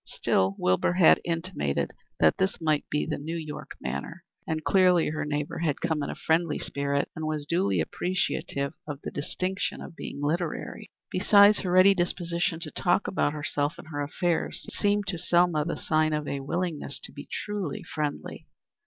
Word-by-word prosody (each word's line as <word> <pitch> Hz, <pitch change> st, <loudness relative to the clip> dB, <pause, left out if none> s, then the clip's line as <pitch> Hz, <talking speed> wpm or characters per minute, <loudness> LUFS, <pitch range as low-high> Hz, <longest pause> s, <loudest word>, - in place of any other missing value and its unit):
Still 95 Hz, +1 st, +1 dB
Wilbur 90 Hz, -, +2 dB
had 180 Hz, -3 st, +6 dB
intimated 165 Hz, -, -1 dB, 0.3 s
that 80 Hz, -1 st, +4 dB
this 190 Hz, +1 st, +1 dB
might 155 Hz, -3 st, 0 dB
be 150 Hz, -, 0 dB
the -, -, -3 dB
New 160 Hz, +4 st, -4 dB
York 155 Hz, -2 st, -7 dB
manner, 70 Hz, -, -5 dB, 0.2 s
and 155 Hz, -1 st, -2 dB
clearly 180 Hz, -2 st, +4 dB
her 155 Hz, 0 st, -2 dB
neighbor 150 Hz, 0 st, -2 dB
had 155 Hz, -4 st, 0 dB
come 160 Hz, -3 st, 0 dB
in -, -, -3 dB
a -, -, -4 dB
friendly 165 Hz, 0 st, +1 dB
spirit 140 Hz, 0 st, -1 dB
and 160 Hz, 0 st, -3 dB
was 155 Hz, -2 st, -2 dB
duly 100 Hz, -, +1 dB
appreciative 140 Hz, -, -1 dB
of 145 Hz, -2 st, -5 dB
the -, -, -4 dB
distinction 185 Hz, +6 st, -2 dB
of -, -, -9 dB
being -, -, -7 dB
literary. 160 Hz, +3 st, -2 dB, 0.2 s
Besides, 205 Hz, +2 st, +6 dB
her 185 Hz, -, -2 dB
ready 185 Hz, +2 st, +7 dB
disposition 175 Hz, -2 st, -1 dB
to 155 Hz, -3 st, -5 dB
talk 180 Hz, +2 st, +1 dB
about 145 Hz, -5 st, +1 dB
herself 150 Hz, +1 st, -1 dB
and 155 Hz, -, -11 dB
her 145 Hz, -2 st, -3 dB
affairs 165 Hz, +3 st, -1 dB
seemed 205 Hz, 0 st, +1 dB
to 185 Hz, -3 st, -3 dB
Selma 175 Hz, -3 st, +3 dB
the 170 Hz, -, -2 dB
sign 155 Hz, -1 st, +1 dB
of 150 Hz, -1 st, -2 dB
a 140 Hz, -, -2 dB
willingness 150 Hz, -1 st, -2 dB
to -, -, -6 dB
be 145 Hz, -, -10 dB
truly 205 Hz, -8 st, -3 dB
friendly. 150 Hz, -2 st, -4 dB
160 Hz, 175 wpm, -27 LUFS, 145-180 Hz, 0.3 s, ready